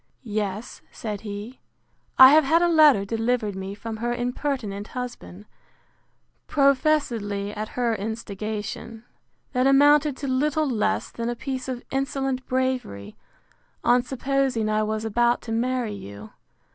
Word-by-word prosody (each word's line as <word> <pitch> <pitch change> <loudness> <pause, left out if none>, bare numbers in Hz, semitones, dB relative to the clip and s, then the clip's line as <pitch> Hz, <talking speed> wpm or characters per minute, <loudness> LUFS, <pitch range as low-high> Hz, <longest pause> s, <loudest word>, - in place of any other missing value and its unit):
Yes, 210 -1 -4
said 210 -3 -6
he; 210 +4 -7 0.6
I 260 0 +10
have 310 +1 +6
had 325 +5 +3
a - - +4
letter 305 -11 +5
delivered 225 -1 -1
me 190 +1 -6
from 220 +1 -6
her 240 +2 -2
impertinent 245 -5 -3
husband, 240 -6 -7 1.0
professedly 260 -8 +1
at 215 +3 -6
her 240 -2 +1
instigation, 220 +1 -5 0.5
that 255 +1 +2
amounted 290 +1 +5
to 280 - -5
little 295 +4 +1
less 215 -3 -1
than 230 0 -4
a 240 - -2
piece 260 0 -5
of 250 -1 -5
insolent 270 -1 -2
bravery, 255 - -2 0.7
on 245 +1 +4
supposing 265 -3 -1
I 215 0 +1
was 215 +1 -2
about 240 +2 +2
to 225 - -6
marry 240 -1 -1
you. 100 - -10
240 Hz, 135 wpm, -24 LUFS, 215-265 Hz, 1.0 s, I